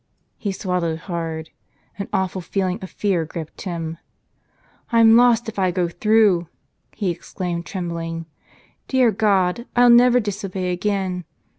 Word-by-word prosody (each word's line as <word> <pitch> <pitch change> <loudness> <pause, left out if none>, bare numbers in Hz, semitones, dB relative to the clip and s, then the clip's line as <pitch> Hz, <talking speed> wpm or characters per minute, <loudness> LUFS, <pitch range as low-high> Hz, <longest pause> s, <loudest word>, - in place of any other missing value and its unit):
He 205 - -2
swallowed 180 -4 -2
hard. 165 -3 -4 0.5
An 200 - -4
awful 190 0 -1
feeling 185 +1 -2
of 190 - -7
fear 190 -5 0
gripped 160 0 -8
him. 165 -3 -4 0.9
"I'm 230 -1 +6
lost 240 -1 +4
if 220 -2 -5
I 185 -1 +3
go 180 -1 0
through 210 -3 +3 0.2
!" - - -36
he 195 -5 0
exclaimed 170 0 -5
trembling. 165 -3 -4 0.6
"Dear 255 -3 +3
God, 200 +1 +1
I'll 245 0 +6
never 245 +1 +6
disobey 195 -4 -3
again. 185 -1 -2
185 Hz, 135 wpm, -21 LUFS, 170-215 Hz, 0.9 s, I'm